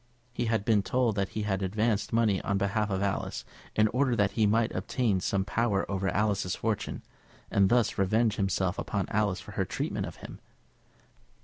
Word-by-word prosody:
He 120 - -1
had 110 -2 0
been 110 -3 +4
told 120 +1 +1
that 100 -1 -1
he 105 - 0
had 95 -2 -1
advanced 105 +3 0
money 110 -4 +2
on 100 - 0
behalf 100 +2 0
of 95 0 -1
Alice, 100 -1 -2 0.3
in 110 0 +4
order 125 +1 +1
that 105 -3 +2
he 110 -2 +2
might 115 +2 +2
obtain 115 -8 0
some 95 +1 0
power 105 -3 0
over 95 0 0
Alice's 100 -3 0
fortune, 110 -2 -3 0.5
and 100 -1 +4
thus 120 -3 +2
revenge 110 +3 +2
himself 95 -1 0
upon 100 -1 -2
Alice 105 -3 0
for - - -11
her - - -1
treatment - - -3
of - - -9
him. - - -10
105 Hz, 185 wpm, -29 LUFS, 95-115 Hz, 0.5 s, been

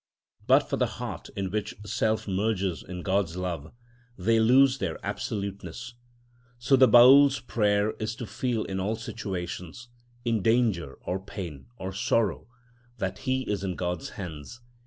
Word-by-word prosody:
But - - +5
for - - -1
the - - +2
heart - - -6
in 95 -2 -3
which 105 0 -3
self 110 +2 0
merges 95 -2 -1
in 90 -1 -7
God's 95 -3 0
love, 85 -4 -4 0.5
they 115 +5 +2
lose 130 +4 +5
their 90 -8 -2
absoluteness. 100 +4 -5 0.6
So 125 +3 +3
the 130 0 +7
Baül's 135 +4 +8
prayer 105 -3 +1
is 110 0 -3
to 120 - -6
feel 120 0 -2
in 95 -1 -4
all 105 +4 -1
situations—in 115 +4 -5
danger, 110 - +1
or 90 +2 -2
pain, 85 -10 -7
or 95 0 -5
sorrow—that 120 +4 -3
he 130 0 -1
is 100 -4 -2
in 95 -2 -2
God's 90 -2 -3
hands. 85 +3 -7
105 Hz, 140 wpm, -27 LUFS, 95-120 Hz, 0.6 s, Baül's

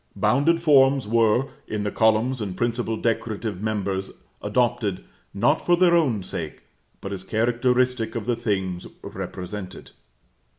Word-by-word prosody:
Bounded 140 - +2
forms 135 -5 +5
were, 115 +3 +2 0.2
in 105 -1 -3
the 105 - -2
columns 110 +3 +2
and 95 -3 -4
principal 120 -1 -1
decorative 110 -3 -2
members, 100 -3 -2 0.3
adopted, 105 - 0 0.3
not 145 +10 +1
for 175 0 +3
their 175 -1 +4
own 130 - +2
sake, 80 -4 -6 0.4
but 100 - -5
as 95 -1 -6
characteristic 120 +2 +1
of 115 -3 -3
the 120 0 +1
things 95 -6 -2 0.2
represented. 95 0 -7
110 Hz, 130 wpm, -24 LUFS, 100-125 Hz, 0.4 s, forms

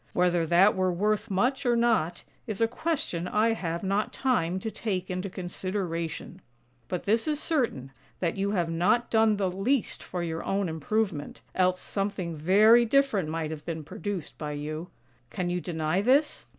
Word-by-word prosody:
Whether 175 -2 +2
that 180 +5 +5
were 185 -1 +1
worth 210 +5 0
much 250 +8 +1
or 240 -2 +3
not, 225 -8 +1 0.2
is 215 -4 -4
a 225 - +4
question 235 - -2
I 220 +4 +2
have 170 -4 -3
not 200 +2 0
time 190 -10 0
to 220 - -3
take 190 -4 -3
into 185 +2 -3
consideration; 180 -1 -4 0.5
but 180 - -3
this 225 +7 +1
is 300 -1 0
certain, 240 - -1 0.3
that 170 -2 0
you 200 0 0
have 175 -5 0
not 180 +9 +2
done 220 -2 +4
the 190 -2 0
least 215 +8 0
for 175 -1 -4
your 165 -1 -3
own 195 -1 0
improvement, 160 0 -2
else 185 0 +2
something 195 -4 -3
very 210 +9 +6
different 235 - +2
might 160 -1 -2
have 155 -1 -6
been 160 -1 -4
produced 195 0 -5
by 150 -1 -3
you. 155 +3 -5 0.4
Can 175 +9 -2
you 180 0 -1
deny 165 +1 -1
this? 270 +7 +2
185 Hz, 170 wpm, -28 LUFS, 170-220 Hz, 0.5 s, very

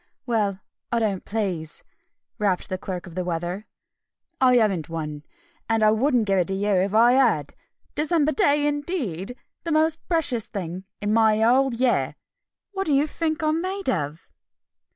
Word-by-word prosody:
"Well, 210 -5 0 0.3
I 235 - +1
don't 210 -5 -1
please!" 185 -7 -3 0.6
rapped 200 -4 0
the 185 - -3
Clerk 185 -3 -5
of 175 - -11
the 185 +1 -2
Weather. 175 +4 -3 0.7
"I 255 -1 +6
haven't 195 -10 +2
one! 150 -3 -5 0.5
And 225 -1 +2
I 215 - +6
wouldn't 240 +1 +2
give 195 -2 +2
it 175 - +1
to 195 - -1
you 205 +2 -1
if 195 +1 +1
I 235 +2 +6
had! 240 - +2 0.4
December 310 0 +2
day, 295 -6 +2
indeed! 280 - -3 0.3
The 335 - -3
most 315 +1 +2
precious 285 - +2
thing 185 -1 -5 0.2
in 210 +1 0
my 220 -1 +4
whole 260 +4 +4
year! 240 +1 +1 0.6
What 390 -2 -3
do 300 - +2
you 280 +2 +4
think 315 +1 -2
I'm 310 +1 +1
made 385 +2 -2
of?" 150 - -4
220 Hz, 165 wpm, -24 LUFS, 185-290 Hz, 0.7 s, I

